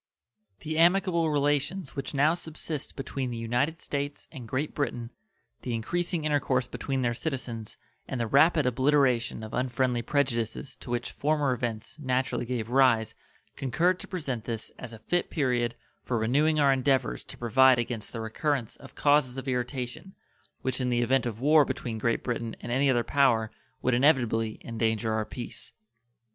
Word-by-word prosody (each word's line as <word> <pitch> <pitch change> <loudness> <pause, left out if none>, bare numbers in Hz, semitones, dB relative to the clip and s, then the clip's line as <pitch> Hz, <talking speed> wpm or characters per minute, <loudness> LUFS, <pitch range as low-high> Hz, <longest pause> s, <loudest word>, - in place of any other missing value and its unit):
The 155 0 -2
amicable 170 -1 +4
relations 145 +3 0
which 140 +1 -4
now 150 +4 +4
subsist 160 -3 -4
between 135 -1 -3
the 120 - -4
United 125 +8 0
States 145 0 -4
and 130 -7 -9
Great 135 +6 -2
Britain, 120 -4 -3 0.5
the 120 - -2
increasing 170 - -2
intercourse 135 -4 +1
between 135 0 -3
their 120 -1 +1
citizens, 120 -4 -4 0.3
and 130 - -4
the 115 - +1
rapid 150 +5 +4
obliteration 125 -2 +2
of 110 - -8
unfriendly 125 -1 0
prejudices 125 -2 -1
to - - -11
which 120 0 -2
former 145 -2 +1
events 115 +2 -4
naturally 130 -3 -1
gave 120 -2 -3
rise 125 -5 +4 0.4
concurred 170 +8 +1
to - - -9
present 140 - -4
this 115 -2 -4
as 125 - -7
a 115 - -9
fit 175 +11 -1
period 125 -5 0 0.3
for 120 - -1
renewing 145 +8 +2
our 140 -2 +5
endeavors 135 0 +1
to - - -11
provide 130 +2 +5
against 120 -2 -3
the 115 - -5
recurrence 120 +2 -2
of - - -14
causes 145 -3 +3
of 135 - -5
irritation 125 +7 -3 0.5
which 130 0 -1
in 125 - 0
the 120 0 +2
event 130 +1 +2
of 110 -2 -5
war 150 +3 +6
between 115 -4 -4
Great 115 +2 0
Britain 115 -2 -3
and - - -6
any 135 +3 +3
other 120 -2 +3
power 115 -6 +2 0.3
would 130 - +2
inevitably 120 -5 +2
endanger 110 -1 -1
our 110 0 0
peace. 120 +2 -7
130 Hz, 165 wpm, -28 LUFS, 120-145 Hz, 0.5 s, war